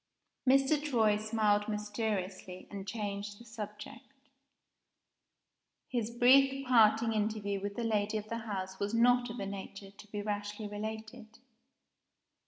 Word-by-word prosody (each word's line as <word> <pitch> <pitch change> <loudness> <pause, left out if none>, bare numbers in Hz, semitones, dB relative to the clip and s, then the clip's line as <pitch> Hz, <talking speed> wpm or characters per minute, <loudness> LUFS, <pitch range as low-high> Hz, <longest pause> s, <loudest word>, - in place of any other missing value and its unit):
Mr. 275 +3 +4
Troy 225 -8 +3
smiled 215 -1 +1
mysteriously, 205 -3 -3
and 200 -1 -7
changed 205 -1 -4
the 235 - -13
subject. 225 +4 -9 1.8
His 235 -3 -1
brief 270 +3 +5
parting 225 -2 +5
interview 210 -2 -1
with 200 0 -4
the 235 - -3
lady 215 -1 0
of 210 0 -6
the 230 +1 -3
house 190 -4 -5
was 205 +3 -1
not 245 +1 +4
of 235 - -6
a 200 - -3
nature 195 0 -7
to 200 +1 -15
be 205 0 -5
rashly 205 0 -3
related. 220 +1 -7
215 Hz, 130 wpm, -32 LUFS, 205-230 Hz, 1.8 s, brief